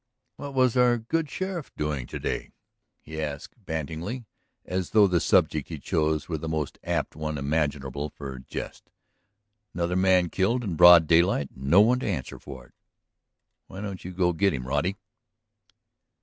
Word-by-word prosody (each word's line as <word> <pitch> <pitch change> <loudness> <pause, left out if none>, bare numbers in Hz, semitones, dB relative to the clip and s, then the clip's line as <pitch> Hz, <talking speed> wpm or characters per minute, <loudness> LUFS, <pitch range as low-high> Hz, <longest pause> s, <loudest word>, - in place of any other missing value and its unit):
"What 140 -1 -7
was 130 -2 +3
our 125 -1 +4
good 150 +7 -2
sheriff 185 -2 -4
doing 75 -5 -2
to - - -6
day?" - - -3 0.5
he 80 0 -6
asked 75 -2 -5
banteringly, 80 - -4 0.4
as 90 -1 -3
though 105 -2 +6
the 90 -3 +2
subject - - +2
he - - -5
chose 75 -1 -1
were 80 -3 -3
the 80 - -5
most 80 -3 -3
apt - - -2
one 75 0 -3
imaginable 70 -1 -2
for 70 -3 -8
jest. 65 - -8 0.9
"Another 85 0 -1
man 95 -2 +3
killed 115 +7 +1
in 100 -6 -3
broad 85 +1 +8
daylight 85 -2 +3
and 65 - -10
no 85 +9 +6
one 120 +4 +4
to - - -4
answer 80 - -4
for - - -10
it! - - -25 0.9
Why 95 - -9
don't 100 -3 -6
you 90 - -6
go 90 -1 +1
get 95 0 +2
'em, 65 -1 -5
Roddy?" 75 +9 -1
85 Hz, 165 wpm, -26 LUFS, 75-100 Hz, 0.9 s, broad